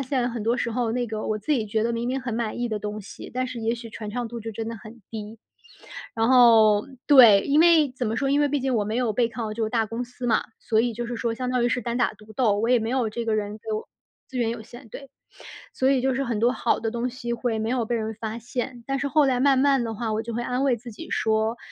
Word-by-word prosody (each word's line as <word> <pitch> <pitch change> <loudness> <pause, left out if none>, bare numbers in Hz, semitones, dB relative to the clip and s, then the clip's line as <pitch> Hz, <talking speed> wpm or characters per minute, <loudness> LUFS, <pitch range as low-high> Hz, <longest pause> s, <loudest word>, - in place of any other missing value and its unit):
现 255 -2 -1
很 235 -2 -4
多 230 +3 +1
时 235 - -1
候 230 -1 -1
那 245 +1 0
个 215 -1 -4
我 215 - 0
自 215 +8 -6
己 235 -7 0
觉 215 +1 0
得 235 +1 0
明 235 +1 -2
明 265 +2 -1
很 250 -2 -4
满 225 0 -2
意 240 - -1
的 215 -2 -2
东 210 +1 -5
西， 200 - -10
但 255 0 0
是 255 -1 -6
也 225 +1 0
许 230 -1 -9
传 215 0 -7
唱 240 +2 -3
度 235 +1 -6
就 225 0 -6
真 225 +1 -4
的 230 - -5
很 220 +3 -13
低。 220 0 -7 0.8
然 225 0 +1
后 225 -5 +6 0.2
对， 240 -9 +8
因 285 +1 +2
为 325 -4 +5
怎 250 -2 -3
么 220 - -1
说， 275 +1 0
因 285 - +3
为 290 - +3
毕 285 0 0
竟 265 0 -1
我 210 - +1
没 215 +2 -2
有 245 -3 +1
背 235 +2 +1
靠 230 -2 -5
这 230 - -3
个 220 - 0
大 225 -1 +1
公 230 +3 -4
司 245 +1 -7
嘛， 225 -2 +2 0.2
所 220 -2 +2
以 240 +1 0
就 240 +1 -4
是 240 - -4
说 230 0 -1
相 250 +1 -3
当 250 -1 +1
于 - - +3
是 245 - 0
单 235 +2 -2
打 245 - +1
独 215 0 -15
斗， 215 -3 +2
我 225 - 0
也 250 0 +5
没 225 0 -3
有 250 -4 0
这 235 +2 -4
个 225 -1 0
人 205 -1 -2
给 220 0 -6
我 215 - -5 0.4
资 260 - -5
源 235 -2 +1
有 230 -1 -5
限， 240 +2 -13
对。 275 +5 -10 0.6
所 260 - +2
以 265 -2 +2
就 265 +1 +1
是 270 +2 -1
很 235 -5 -2
多 235 +2 +3
好 240 - 0
的 225 0 -2
东 240 +1 -2
西 240 -1 -4
会 235 -1 -2
没 220 +1 -2
有 245 -2 0
被 240 - -1
人 220 -1 -2
发 220 +1 -4
现， 245 +1 -5
但 275 0 -1
是 285 - -1
后 300 +1 +3
来 255 -2 +1
慢 270 0 +4
慢 275 -1 +3
的 225 -1 -3
话， 225 0 -3
我 215 - -1
就 230 +1 -6
会 235 - -2
安 250 +2 -1
慰 270 -3 +3
自 240 +1 -10
己 330 +10 -10
说： 220 +1 0
235 Hz, 320 characters per minute, -25 LUFS, 220-255 Hz, 0.8 s, 对